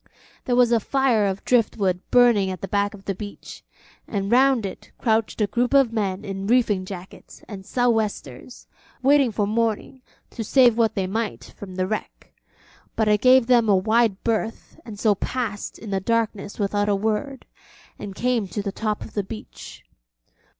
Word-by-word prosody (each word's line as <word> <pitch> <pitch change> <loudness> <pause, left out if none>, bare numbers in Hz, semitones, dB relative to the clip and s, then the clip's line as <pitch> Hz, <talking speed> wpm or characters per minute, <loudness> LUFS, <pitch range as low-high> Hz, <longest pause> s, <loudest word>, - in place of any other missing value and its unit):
There 245 - +1
was 245 -1 +4
a 235 - +4
fire 245 -3 +1
of 195 0 -4
driftwood 205 -6 +1
burning 235 -6 +4
at 185 - -6
the 195 - -4
back 205 +1 0
of 195 -1 -16
the 195 - -1
beach, 205 +1 -10 0.4
and 200 -1 -3
round 260 -2 +4
it 190 - -8
crouched 225 -1 0
a - - +4
group 245 +6 0
of 265 -5 +4
men 195 -4 -2
in 195 0 -5
reefing 220 -5 +2
jackets 185 -1 -11
and 195 -3 -8
sou'westers 220 - -2 0.4
waiting 275 -2 +4
for 205 -1 0
morning 230 +4 -2 0.3
to 230 - -5
save 245 0 +4
what 225 -2 +1
they 195 - 0
might 220 +3 -4
from 190 -2 -10
the 185 0 0
wreck; 215 +3 -6 0.6
but 220 - +1
I 210 - +5
gave 255 +3 +5
them 235 -3 +3
a 200 - +5
wide 215 +1 +1
berth 225 +4 -3
and 215 -3 -9
so 215 -1 +3
passed 210 0 -4
in 215 - -9
the 195 - 0
darkness 215 -1 -2
without 205 0 0
a 205 - +3
word, 220 +6 -2 0.5
and 195 -2 -7
came 240 -3 0
to 205 +2 -4
the 200 - -3
top 215 +1 -3
of - - -11
the 205 - -1
beach. 215 +3 -10
215 Hz, 180 wpm, -23 LUFS, 200-235 Hz, 0.6 s, I